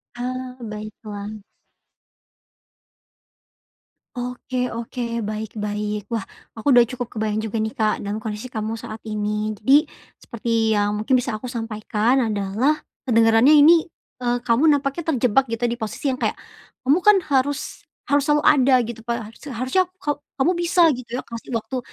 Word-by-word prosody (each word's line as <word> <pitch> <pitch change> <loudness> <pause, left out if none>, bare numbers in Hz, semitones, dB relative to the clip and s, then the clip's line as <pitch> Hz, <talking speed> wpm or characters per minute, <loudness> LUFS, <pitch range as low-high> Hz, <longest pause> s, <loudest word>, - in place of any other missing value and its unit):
Ah, 255 +1 -5
Baiklah. 215 -1 -7 2.7
Oke 250 0 -3
oke, 235 +2 -5 0.2
baik 215 +1 -5
baik, 210 0 -3
wah 225 -4 -2 0.2
aku 225 +4 -8
udah 240 - +8
cukup 250 -2 -4
kebayang 215 -1 -1
juga 220 - -6
nih, 220 - -2
Kak, 215 -1 0
dalam 205 +2 -3
kondisi 220 +3 -6
kamu 220 -1 -3
saat 220 -1 -8
ini. 210 0 -2
Jadi, 275 +9 +4 0.3
seperti 225 -1 0
yang 205 0 +1
mungkin 255 +5 +2
bisa 250 -2 0
aku 250 - -6
sampaikan 225 +1 0
adalah, 210 +7 +1 0.3
kedengarannya 230 +4 +5
ini, 315 +3 +6 0.3
eee, 245 -1 0
kamu 245 +5 +3
nampaknya 290 +2 +1
terjebak, 250 +2 +2
gitu, 230 +1 -4
di 240 0 0
posisi 225 +5 -2
yang 255 - -4
kayak, - - 0 0.5
kamu 275 +5 +4
kan, 420 +3 +6 0.2
harus 280 +2 -1 0.2
harus 285 -1 +2
selalu 295 0 +3
ada, 270 -2 +5
gitu, 235 0 -6
pa 235 -1 -1
harus - - -20
harusnya 260 +8 +1 0.2
ka 290 -1 -1 0.2
kamu 275 +6 +2
bisa, 345 +1 +2
gitu 245 -3 -5
ya, 255 - -2
kasih 230 +1 -8
waktu 225 +3 -3
235 Hz, 150 wpm, -22 LUFS, 215-265 Hz, 2.7 s, udah